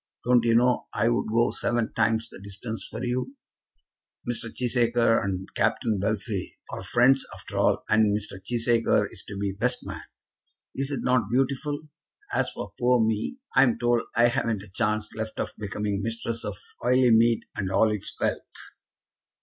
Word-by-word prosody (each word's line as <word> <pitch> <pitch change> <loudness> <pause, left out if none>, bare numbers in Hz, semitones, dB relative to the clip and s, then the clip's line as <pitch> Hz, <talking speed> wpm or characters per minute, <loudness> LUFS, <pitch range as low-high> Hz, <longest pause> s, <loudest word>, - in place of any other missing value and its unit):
Don't 125 -1 +4
you 115 -1 +4
know 125 +1 +3
I 115 - +2
would 120 - 0
go 115 +2 +3
seven 120 -2 -1
times 115 0 +1
the - - -12
distance 100 +3 -6
for 115 - -6
you? 125 +2 -2 0.9
Mr. 115 -1 -2
Cheesacre 120 -2 +2
and 95 -1 -3
Captain 110 -3 +1
Bellfield 100 -1 -2 0.2
are - - -5
friends 125 +8 +4
after - - -6
all, - - +2
and 110 -2 +3
Mr. 95 -2 -6
Cheesacre 115 -1 +2
is 95 - -8
to 100 - -6
be 100 0 -1
best 115 +6 -1
man. - - -6 0.7
Is 135 +1 -2
it 140 - -2
not 125 -5 +2
beautiful? 140 +4 -1 0.5
As - - +1
for - - -7
poor 125 0 +4
me, 110 - -1 0.2
I'm 125 -4 +5
told 120 -1 +2
I 120 +1 +5
haven't 115 -4 -1
a 100 - -14
chance 105 +2 -1
left 110 0 -5
of - - -2
becoming 105 -1 -2
mistress 115 +1 -2
of 105 -1 -4 0.3
Oileymead 120 -2 +4
and 100 -4 -2
all 110 +3 +4
its 105 -2 -4
wealth." - - 0
115 Hz, 165 wpm, -26 LUFS, 105-120 Hz, 0.9 s, I'm